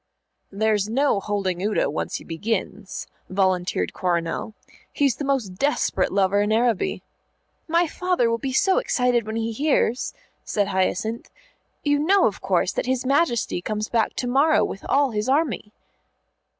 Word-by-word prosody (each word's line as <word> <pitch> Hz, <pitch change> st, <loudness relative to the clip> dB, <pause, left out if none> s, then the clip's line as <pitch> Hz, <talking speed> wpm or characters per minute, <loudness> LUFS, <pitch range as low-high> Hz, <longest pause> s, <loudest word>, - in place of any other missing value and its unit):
"There's 210 Hz, 0 st, +1 dB
no 270 Hz, -2 st, +2 dB
holding 195 Hz, -3 st, -2 dB
Udo 210 Hz, +2 st, +1 dB
once 150 Hz, -, -3 dB
he -, -, -5 dB
begins," 200 Hz, +3 st, -4 dB, 0.2 s
volunteered 185 Hz, -1 st, 0 dB
Coronel. 175 Hz, +4 st, -2 dB, 0.4 s
"He's 275 Hz, -6 st, +1 dB
the -, -, -4 dB
most 255 Hz, -10 st, -1 dB
desperate 280 Hz, -9 st, +1 dB
lover 200 Hz, +1 st, +2 dB
in 210 Hz, +1 st, 0 dB
Araby. 230 Hz, -1 st, +1 dB, 0.6 s
"My 340 Hz, +2 st, +3 dB
father 360 Hz, -5 st, 0 dB
will 230 Hz, 0 st, 0 dB
be 265 Hz, +3 st, -3 dB
so 380 Hz, -, +3 dB
excited 250 Hz, -, +1 dB
when 220 Hz, -, -4 dB
he 225 Hz, 0 st, -1 dB
hears," 260 Hz, -1 st, 0 dB, 0.3 s
said 205 Hz, -1 st, -1 dB
Hyacinth. 205 Hz, +4 st, -1 dB, 0.5 s
"You 290 Hz, -1 st, +2 dB
know, 375 Hz, +5 st, +4 dB
of 205 Hz, -, -1 dB
course, 185 Hz, -1 st, +1 dB
that -, -, -3 dB
his 260 Hz, 0 st, 0 dB
Majesty 270 Hz, -, +1 dB
comes 215 Hz, +2 st, -3 dB
back 225 Hz, -2 st, +1 dB
to 250 Hz, -, -2 dB
morrow 280 Hz, +5 st, +3 dB
with 195 Hz, -, -6 dB
all 280 Hz, -2 st, +3 dB
his 215 Hz, +2 st, -2 dB
army." 270 Hz, -7 st, 0 dB
225 Hz, 150 wpm, -23 LUFS, 200-275 Hz, 0.6 s, know